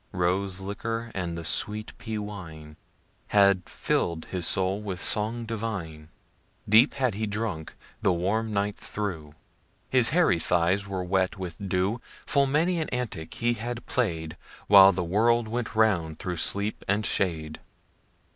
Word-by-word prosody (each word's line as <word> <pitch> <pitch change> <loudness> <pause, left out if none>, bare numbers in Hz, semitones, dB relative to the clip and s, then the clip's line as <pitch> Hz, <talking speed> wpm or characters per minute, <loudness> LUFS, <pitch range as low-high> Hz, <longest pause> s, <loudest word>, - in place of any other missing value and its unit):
Rose 95 +1 0
liquor 115 +4 -4
and 85 -3 -3
the 85 - -5
sweet 105 +6 -2
pea 110 -2 -4
wine 80 -8 -8 0.5
Had 100 -3 +4
fill' 85 - 0
d 80 - -10
his 90 -3 0
soul 95 +1 +1
with 95 -4 -5
song 110 +4 0
divine; 100 -9 -5 0.6
Deep 110 +7 +5
had 130 -5 +1
he 110 +2 -2
drunk 105 -6 -4 0.3
the 95 - +3
warm 100 +6 0
night 100 0 0
through, 80 -8 -5 0.6
His 125 -3 +5
hairy 155 - +3
thighs 90 +4 +1
were 95 -2 -3
wet 95 +2 0
with 95 +1 -6
dew. 95 +6 0 0.2
Full 140 -1 +3
many 165 +6 +1
an 155 - -3
antic 115 -11 -4
he 120 0 +1
had 120 +1 -5
play'd 80 -10 -2 0.3
While 100 -1 +9
the 90 -1 -2
world 115 +6 +2
went 115 0 -3
round 90 -8 +2
through 90 0 -4
sleep 100 +5 0
and 100 +1 +1
shade. 80 -6 -1
100 Hz, 150 wpm, -27 LUFS, 90-110 Hz, 0.6 s, While